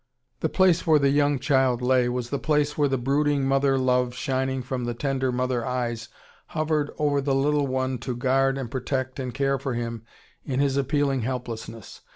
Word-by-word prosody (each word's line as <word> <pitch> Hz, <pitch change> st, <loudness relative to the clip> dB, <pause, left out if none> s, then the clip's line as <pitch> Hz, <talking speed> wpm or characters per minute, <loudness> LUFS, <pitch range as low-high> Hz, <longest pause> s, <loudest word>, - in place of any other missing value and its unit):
] -, -, -49 dB
"The -, -, +1 dB
place 185 Hz, -3 st, +3 dB
where 155 Hz, -1 st, +6 dB
the 140 Hz, -1 st, +3 dB
young 145 Hz, 0 st, +2 dB
Child 130 Hz, -3 st, +2 dB
lay" 125 Hz, -1 st, +3 dB
was 120 Hz, -1 st, -3 dB
the 140 Hz, -, -1 dB
place 150 Hz, -1 st, +1 dB
where 145 Hz, -1 st, +2 dB
the 135 Hz, -1 st, 0 dB
brooding 140 Hz, +2 st, +1 dB
mother 135 Hz, 0 st, +2 dB
love 125 Hz, -1 st, +1 dB
shining 130 Hz, 0 st, -1 dB
from 125 Hz, -1 st, -3 dB
the 120 Hz, 0 st, -3 dB
tender 135 Hz, 0 st, -1 dB
mother 125 Hz, -1 st, -1 dB
eyes 120 Hz, -3 st, -3 dB, 0.4 s
hovered 155 Hz, -1 st, -1 dB
over 145 Hz, -2 st, +1 dB
the 135 Hz, 0 st, 0 dB
little 145 Hz, +1 st, +2 dB
One 130 Hz, -1 st, -1 dB
to 120 Hz, +1 st, -4 dB
guard 135 Hz, +2 st, +1 dB
and 130 Hz, -4 st, -5 dB
protect 130 Hz, 0 st, -3 dB
and 130 Hz, -1 st, -3 dB
care 135 Hz, +1 st, 0 dB
for 135 Hz, -2 st, -3 dB
Him 115 Hz, -1 st, -4 dB, 0.4 s
in 130 Hz, -2 st, -2 dB
His 140 Hz, -1 st, +2 dB
appealing 140 Hz, -1 st, +1 dB
helplessness. 115 Hz, -3 st, -6 dB
135 Hz, 190 wpm, -25 LUFS, 125-140 Hz, 0.4 s, where